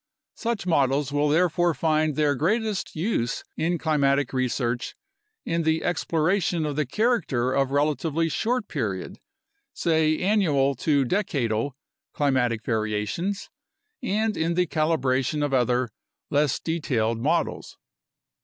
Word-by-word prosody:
Such 230 -5 -3
models 140 -4 +2
will 145 +1 +1
therefore 175 +1 +2
find 155 -2 +1
their 150 -1 +2
greatest 210 - -1
use 155 - -1
in 170 +2 0
climatic 140 -4 +1
research 125 -1 -1 0.5
in 165 0 0
the 160 0 +1
exploration 175 0 0
of 150 -2 -2
the 150 -2 0
character 150 - +1
of 135 -1 +1
relatively 150 +3 +1
short 225 - -1
period 105 - -4 0.6
(say 160 -2 +2
annual 165 -9 +2
to 140 -1 +2
decadal) 135 - -1 0.4
climatic 125 -6 +1
variations 110 - -2 0.5
and 215 +1 0
in 165 +1 0
the 180 0 +3
calibration 150 -3 0
of 140 - -3
other, 125 0 +2 0.4
less 145 -2 +2
detailed 120 -9 -1
models. - - -1
150 Hz, 115 wpm, -25 LUFS, 130-170 Hz, 0.6 s, the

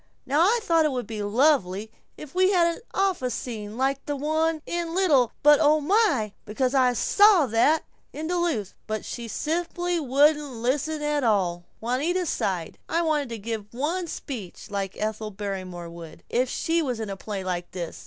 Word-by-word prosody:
Now 290 +4 +2
I 435 +7 +4
thought 330 -6 +3
it 305 - +2
would 250 -2 -3
be 220 -2 -5
lovely 220 -3 +2 0.3
if 295 -2 -10
we 370 +1 +4
had 340 -3 +3
an - - -13
office 365 - 0
scene 215 -3 -6
like 270 +1 0
the 290 - -1
one 315 +2 0
in 340 -1 -3
'Little, 285 - +3
But 295 0 +7
Oh 305 0 +5
My!' 300 - +2
Because 255 +5 -1
I 255 -2 +4
SAW 400 - +5
that, 285 +8 +3 0.3
in 310 - -6
Duluth. 340 - -1
But 215 -1 -3
she 235 -1 -6
simply 345 +6 -1
wouldn't 290 0 +3
listen 285 +6 -1
at 295 -1 0
all." 180 -6 +1
Juanita 295 +11 0
sighed, 180 - -2
"I 335 +1 +1
wanted 300 -5 0
to 230 - -5
give 215 -1 -5
one 335 +7 -1
speech 215 - -7
like 195 -1 -3
Ethel 215 0 -3
Barrymore 185 -4 -6
would, 165 -1 -11
if 250 +1 +1
she 330 +5 0
was 250 -7 -2
in 215 -3 -4
a - - -4
play 195 0 -5
like 175 -1 -3
this. 175 -2 -6
265 Hz, 180 wpm, -25 LUFS, 215-320 Hz, 0.3 s, But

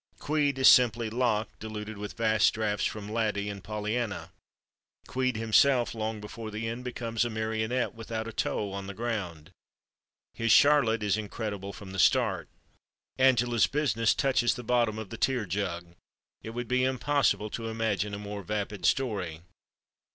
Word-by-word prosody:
"Queed" 145 -2 0
is 130 - +5
simply 115 -2 +5
Locke 110 -3 +1
diluted 110 0 -6
with 105 0 -7
vast 110 -1 +3
drafts 105 -1 0
from 105 -2 -6
"Laddie" 105 -2 -1
and 100 -2 -9
"Pollyanna." 105 -4 -3 0.8
Queed, 130 -1 -1
himself, 120 +3 +3
long 110 -1 -3
before 110 +1 -7
the 110 +1 -4
end, 115 +2 -4
becomes 115 -2 -2
a 120 - -1
marionette 110 +2 -1
without 115 0 -5
a 115 - -7
toe 100 -1 -1
on 100 0 -5
the 100 - -7
ground; 100 -9 -4 0.8
his 115 0 0
Charlotte 120 -6 +5
is 105 0 +1
incredible 100 -2 -5
from 100 -1 -10
the 95 - -5
start. - - +2 0.7
"Angela's 120 -3 +4
Business" 130 -7 +1
touches 130 -4 +2
the 125 - -7
bottom 120 -2 +1
of 110 -3 -7
the 115 - -6
tear 125 -2 +1
jug; 85 -2 -3 0.5
it - - -7
would 120 +1 -5
be 125 0 +1
impossible 130 -4 +1
to 115 -1 -4
imagine 110 -2 -1
a - - -5
more 105 0 -6
vapid 100 -2 -2
story. 100 -12 -1
110 Hz, 160 wpm, -28 LUFS, 105-120 Hz, 0.8 s, is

